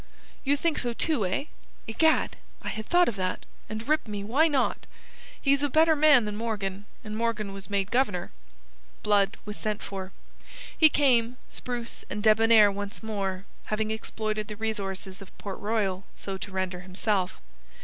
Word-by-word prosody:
"You 285 +1 +2
think 325 +1 0
so, 240 -1 -1
too, 235 - +1
eh? 185 +9 -1 0.4
Egad! 315 +9 +2 0.3
I - - -3
had 220 0 -5
thought 355 0 +5
of 210 -4 -2
it; 185 0 -2 0.2
and, 215 +3 -5
rip 305 -3 +2
me, 205 -1 -4
why 270 +10 +3
not? 280 -5 0 0.5
He's 280 0 +3
a 290 - +1
better 315 +3 +5
man 290 -6 +6
than 210 0 -3
Morgan, 205 -3 -3 0.2
and 215 -1 -6
Morgan 220 -3 -1
was 195 +1 -9
made 200 0 0
Governor." 210 -9 +1 0.7
Blood 205 -2 +3
was 210 0 -6
sent 215 -1 -3
for. 190 -1 -6 0.6
He 315 - +7
came, 250 -4 +3
spruce 240 -2 -5
and 210 0 -4
debonair 220 -1 +6
once 205 +3 -6
more, 195 -3 -3 0.2
having 215 0 -1
exploited 215 -1 -3
the 210 - -6
resources 195 -3 -4
of 195 - -13
Port 195 -2 -6
Royal 205 -3 -1
so 195 - -5
to 195 +1 -7
render 185 -1 -2
himself. 185 +1 -1
215 Hz, 165 wpm, -27 LUFS, 195-240 Hz, 0.7 s, He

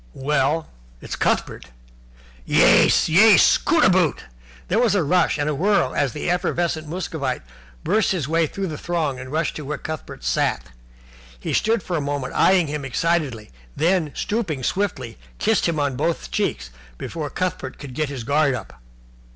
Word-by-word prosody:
"Well, 150 +3 0 0.3
it's - - -6
Cuthbert." - - -1 0.8
"Yais! - - +4
Yais! 205 +6 +6
Cootaboot!" 185 - +2 0.4
There 205 - +1
was 235 -4 +3
a 190 - +2
rush 175 +2 +2
and 145 0 -1
swirl, 155 -1 +1
as 140 -3 0
the 150 - -5
effervescent 175 -2 -1
Muscovite 155 - -3 0.4
burst 220 - +2
his 170 -8 -1
way 165 +1 +1
through 195 +5 -4
the 155 -5 -5
throng 160 -7 -2
and 130 +1 -8
rushed 160 +1 -1
to - - -6
where 150 +2 -4
Cuthbert 155 - -7
sat. 60 -1 -1 0.7
He - - -4
stood 225 -2 +1
for 175 - -2
a - - -1
moment 140 -2 -3
eyeing 185 -2 +4
him 150 -1 -4
excitedly, 135 -5 -1 0.2
then, 165 -2 +1
stooping 170 - -2
swiftly, 135 - -2 0.2
kissed 220 -3 +1
him 165 -2 -1
on 140 -2 0
both 165 +6 -2
cheeks - - -2 0.3
before 155 - -5
Cuthbert 175 -8 -4
could 140 -3 -9
get 155 +2 -2
his 135 -4 -6
guard 140 +1 +2
up. 105 - -10
155 Hz, 160 wpm, -22 LUFS, 140-180 Hz, 0.8 s, Yais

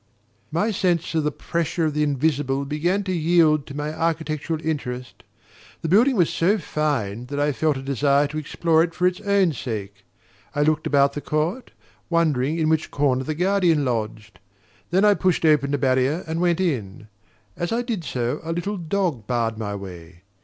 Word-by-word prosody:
My 175 - 0
sense 175 -5 0
of 160 -1 +1
the 150 - 0
pressure 170 +1 -2
of 155 - 0
the 150 - 0
invisible 140 -1 0
began 170 +8 0
to 185 - -3
yield 160 -3 +3
to 140 - -8
my 150 +1 -3
architectural 160 -1 -2
interest. 125 -5 -4 0.6
The 160 - -1
building 240 - +5
was 175 -6 +3
so 195 +6 +2
fine 130 - -2
that 145 +2 -4
I 145 +1 +2
felt 150 +1 0
a 135 - -7
desire 140 +1 +2
to 155 +1 -3
explore 160 +2 +1
it 165 0 -1
for 180 - 0
its 180 +2 +1
own 200 -5 +2
sake. 105 -6 -6 0.5
I 145 - +2
looked 155 0 +1
about 140 -1 +3
the 145 - -5
court, 165 - -2 0.4
wondering 155 -4 +1
in 160 -2 +1
which 160 0 +1
corner 135 -2 +1
the 155 +3 -3
guardian 175 -4 +2
lodged. 110 -4 -3 0.5
Then 190 +4 +3
I 210 - +6
pushed 185 -4 +1
open 150 -3 +4
the 145 - +1
barrier 130 +4 +1
and 160 +1 -3
went 175 -1 +2
in. 110 - -2 0.5
As 175 - -3
I 235 +2 0
did 225 -8 -3
so, 125 -4 -2
a 165 +1 -3
little 195 +5 -3
dog 165 - -2
barred 115 -3 -1
my 105 -2 -3
way. 90 -3 -10
155 Hz, 185 wpm, -23 LUFS, 135-170 Hz, 0.6 s, I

